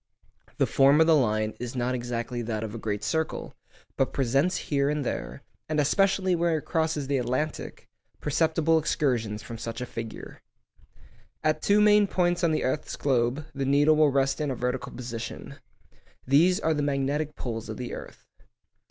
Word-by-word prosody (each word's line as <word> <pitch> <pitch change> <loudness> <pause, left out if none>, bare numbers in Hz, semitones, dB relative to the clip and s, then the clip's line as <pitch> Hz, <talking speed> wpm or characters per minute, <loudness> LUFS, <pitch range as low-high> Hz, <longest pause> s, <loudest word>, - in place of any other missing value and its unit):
The - - +3
form 140 +2 +4
of 160 - +6
the 165 -1 +5
line 110 -5 +1
is 125 +1 -5
not 125 0 0
exactly 120 -1 -3
that 110 -2 -3
of 110 -1 -5
a 115 - -6
great 105 -1 -3
circle, 160 +7 -2 0.4
but 135 - +1
presents 135 +7 +1
here 140 -1 0
and 150 -2 -1
there - - -4 0.3
(and 155 -1 0
especially 190 +5 +2
where 170 -1 +1
it 150 - -6
crosses 160 -3 0
the 140 0 0
Atlantic) 130 +5 -3 0.3
perceptible 160 +2 +2
excursions 120 -9 -1
from 115 -1 -8
such 115 0 -5
a 125 - -3
figure. 115 -2 -8 1.0
At 155 0 +1
two 210 +1 +4 0.2
points 175 -2 0
on 170 - +3
the 155 - 0
earth's 140 +4 -2
globe 130 +1 0
the 135 - -3
needle 145 +3 +4
will 155 -1 +5
rest 135 +1 +1
in 150 - -1
a 130 - -2
vertical 125 +1 -3
position. 120 -2 -7 0.7
These 165 +8 +4
are 160 - +1
the 150 - -1
magnetic 145 +2 -1
poles 115 -2 -5
of 110 - -5
the 125 -1 -5
earth. - - -9
140 Hz, 170 wpm, -27 LUFS, 120-155 Hz, 1.0 s, of